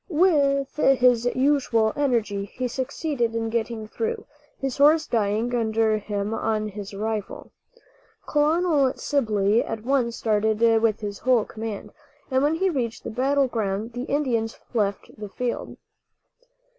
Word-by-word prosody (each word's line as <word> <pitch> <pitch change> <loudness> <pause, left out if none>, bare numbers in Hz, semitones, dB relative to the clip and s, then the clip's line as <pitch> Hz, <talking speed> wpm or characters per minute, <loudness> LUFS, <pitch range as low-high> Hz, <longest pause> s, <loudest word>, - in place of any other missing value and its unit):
With 290 -6 +2
his 250 -4 +4
usual 255 -5 +2
energy 230 -8 0
he 250 +5 -4
succeeded 260 -1 -2
in 225 -1 -2
getting 225 -1 -2
through, 450 - -3 0.3
his 270 -2 -3
horse 305 +3 +5
dying 220 +2 0
under 220 -2 +1
him 205 0 -3
on 215 -1 -1
his 200 -1 -8
arrival. 210 0 -4 0.8
Colonel 300 -2 +2
Sibley 215 -6 +1
at 220 -1 -5
once 245 -2 +1
started 215 0 +1 0.2
with 220 -2 +1
his 205 -1 -5
whole 250 -4 +2
command, 215 -2 -6 0.4
and 260 0 +2
when 295 +3 +2
he 380 +3 +1
reached 240 -6 -3
the - - -5
battle 270 +4 +2
ground 220 -1 -3
the 245 +1 -4
Indians 245 -7 -1
left 200 -4 -1
the 210 -1 -6
field. 245 +4 -4
235 Hz, 135 wpm, -24 LUFS, 215-275 Hz, 0.8 s, horse